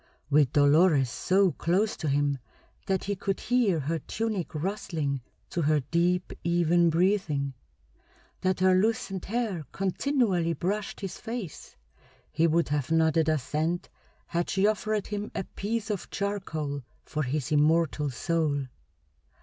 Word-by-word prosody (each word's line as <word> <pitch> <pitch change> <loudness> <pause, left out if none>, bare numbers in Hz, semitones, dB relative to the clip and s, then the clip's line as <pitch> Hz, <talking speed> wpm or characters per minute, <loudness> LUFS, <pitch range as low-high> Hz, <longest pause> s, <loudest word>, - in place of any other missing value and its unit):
With 145 -3 +4
Dolores 145 -2 +5
so 190 +4 +3
close 195 +8 +1
to 160 - -3
him 145 -1 +1 0.5
that 190 -1 0
he 200 0 -1
could 195 0 -2
hear 230 -10 +2
her 160 +4 -1
tunic 215 -6 -3
rustling 155 -5 -2 0.3
to 175 - -1
her 155 0 +3
deep, 175 +6 0
even 170 0 +3
breathing, 165 -6 +1 0.9
that 185 -1 0
her 185 0 +5
loosened 195 -1 0
hair 210 - -2
continually 195 - +1
brushed 200 +6 -3
his 195 -2 -5
face, 225 - -6 0.6
he 165 +2 +3
would 165 0 +2
have 145 -3 -1
nodded 160 -1 +3
assent 155 +4 -1 0.4
had 170 0 -2
she 195 +1 +2
offered 215 -1 0
him 205 0 -4
a - - -1
piece 220 +3 -3
of 200 - -4
charcoal 160 -8 -3 0.2
for 155 - -3
his 140 +1 -2
immortal 150 0 +3
soul. 145 0 0
170 Hz, 135 wpm, -28 LUFS, 150-195 Hz, 0.9 s, Dolores